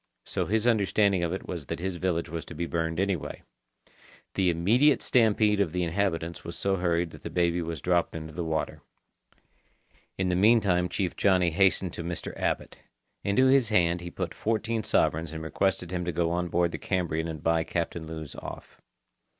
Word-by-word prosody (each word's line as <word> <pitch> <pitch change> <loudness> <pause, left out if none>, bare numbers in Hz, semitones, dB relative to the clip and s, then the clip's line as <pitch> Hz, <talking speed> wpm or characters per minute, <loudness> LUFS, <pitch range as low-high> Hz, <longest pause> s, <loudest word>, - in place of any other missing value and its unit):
So - - -2
his 110 +2 +1
understanding 100 -4 +3
of 85 -1 0
it 95 - -5
was 85 -6 -5
that - - -3
his 90 0 -3
village 85 -1 -1
was 80 +1 -5
to 85 - -10
be 85 +3 -2
burned 80 0 -2
anyway. 95 -5 -2 0.9
The 95 -2 +2
immediate 115 - +3
stampede 110 -3 +3
of 85 -5 0
the 90 0 0
inhabitants 85 -2 -1
was 85 - -7
so 95 0 0
hurried 85 -1 0
that - - -12
the - - -6
baby 85 0 +1
was 80 -2 -5
dropped 90 -2 +1
into 80 -1 -6
the 85 - -3
water. 80 -1 -2 1.4
In 95 -1 0
the 90 - +1
meantime 95 -3 +4
Chief 90 0 -2
Johnny 90 -3 +3
hastened 95 0 +2
to 85 - -5
Mr. 85 0 -5
Abbot. - - -2 0.5
Into 100 +6 +3
his 130 -3 +4
hand 85 -4 +2
he 85 - -6
put - - -4
fourteen 115 +1 -1
sovereigns 80 -5 +1
and 80 0 -5
requested 90 +1 -1
him 90 -1 -2
to 90 - -1
go 85 0 0
on 90 0 -1
board 85 0 +1
the - - -5
Cambrian 85 -4 -1
and 80 -2 -6
buy 80 0 +2
Captain 85 -1 -3
Lewes 80 -3 -7
off. - - -9
90 Hz, 190 wpm, -28 LUFS, 85-100 Hz, 1.4 s, meantime